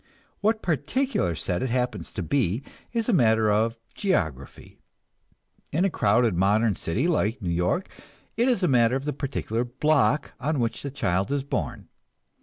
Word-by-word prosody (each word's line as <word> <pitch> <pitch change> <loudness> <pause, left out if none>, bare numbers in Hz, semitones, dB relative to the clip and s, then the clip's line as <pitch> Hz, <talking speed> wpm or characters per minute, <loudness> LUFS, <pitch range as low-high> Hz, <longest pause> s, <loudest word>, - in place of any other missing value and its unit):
What 220 +1 +1
particular 160 - 0
set 90 +2 -2
it 130 - -1
happens 125 +1 -2
to 95 - -3
be 115 - 0 0.3
is 230 -2 -1
a 240 - +2
matter 110 - +4
of 115 +2 +1 0.2
geography; 80 - -2 0.9
in 170 +6 +2
a 195 - +1
crowded 110 - +3
modern 105 +4 +3
city 85 - -1
like 125 - +1
New 90 -6 -2
York, 90 - 0 0.5
it 240 +4 +2
is 235 -7 +1
a - - +4
matter 120 -2 +4
of 135 +1 -3
the 150 - -1
particular 130 -4 -2
block 145 +3 +1
on 150 +1 -1
which 115 -2 -1
the 140 - -4
child 95 -7 -1
is 140 -1 0
born. 140 - -4
125 Hz, 165 wpm, -25 LUFS, 105-155 Hz, 0.9 s, matter